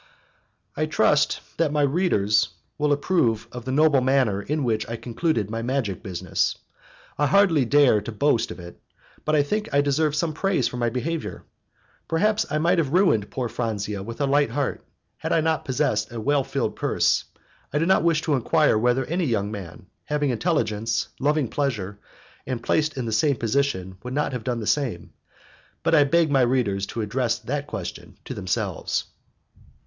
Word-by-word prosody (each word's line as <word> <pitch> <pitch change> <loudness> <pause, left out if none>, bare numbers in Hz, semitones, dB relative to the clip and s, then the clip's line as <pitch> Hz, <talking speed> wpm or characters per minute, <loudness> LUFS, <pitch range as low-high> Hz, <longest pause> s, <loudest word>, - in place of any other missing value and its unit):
I - - 0
trust - - +2 0.2
that 165 -3 +1
my 150 -1 +2
readers 105 - +2 0.3
will 150 0 +2
approve 140 - +1
of 125 -1 -8
the 130 - -2
noble 145 -1 +4
manner 125 -6 +2
in 145 +8 -2
which 110 -3 -1
I 115 - -3
concluded 115 - -1
my 115 0 -3
magic 120 -6 -2
business. 90 -4 -1 0.6
I 145 - +3
hardly 180 -8 +4
dare 135 -4 +4
to 110 - -6
boast 115 +1 +1
of 85 - -8
it, 85 0 -11 0.4
but 155 - +2
I 145 - +4
think 210 +9 -2
I 140 - +4
deserve 145 +1 +1
some 155 +1 0
praise 180 -6 +1
for 125 - -6
my 120 -1 +1
behaviour. 150 +7 -4 0.6
Perhaps, 210 +6 +1
I 150 - 0
might 170 +3 +2
have 145 -3 -1
ruined 175 - +3
poor 130 -2 -3
Franzia 105 -4 -3
with 115 +4 -7
a - - +3
light 145 -1 +2
heart, 135 +3 -2 0.3
had - - -4
I 165 - +3
not 160 0 0
possessed 125 -6 0
a 120 - -5
well 140 +4 +1
filled - - -2
purse. - - +1 0.5
I 150 - 0
do 160 - +2
not 190 - +4
wish 165 -2 +2
to 155 - 0
enquire 140 -2 +3
whether 125 +3 +2
any 175 +4 -1
young 105 -6 -1
man, 95 -4 -8 0.2
having 145 -2 0
intelligence, 115 -6 0
loving 145 0 +1
pleasure, 105 -8 -2 0.5
and 125 -2 -3
placed 155 -2 +1
in 125 - -2
the 115 - -3
same 140 +5 +2
position, 115 -7 -1
would 125 +1 -6
not 150 -1 0
have 125 -3 -4
done 120 -1 -2
the - - -4
same, 125 -8 -1 0.7
but - - +1
I 150 -3 +6
beg 165 +1 +2
my 135 -2 +4
readers 120 -6 +1
to 115 - -4
address 115 +2 0
that 145 +2 -4
question 100 -9 -7
to - - -5
themselves. 95 -1 -2
130 Hz, 185 wpm, -24 LUFS, 110-150 Hz, 0.7 s, I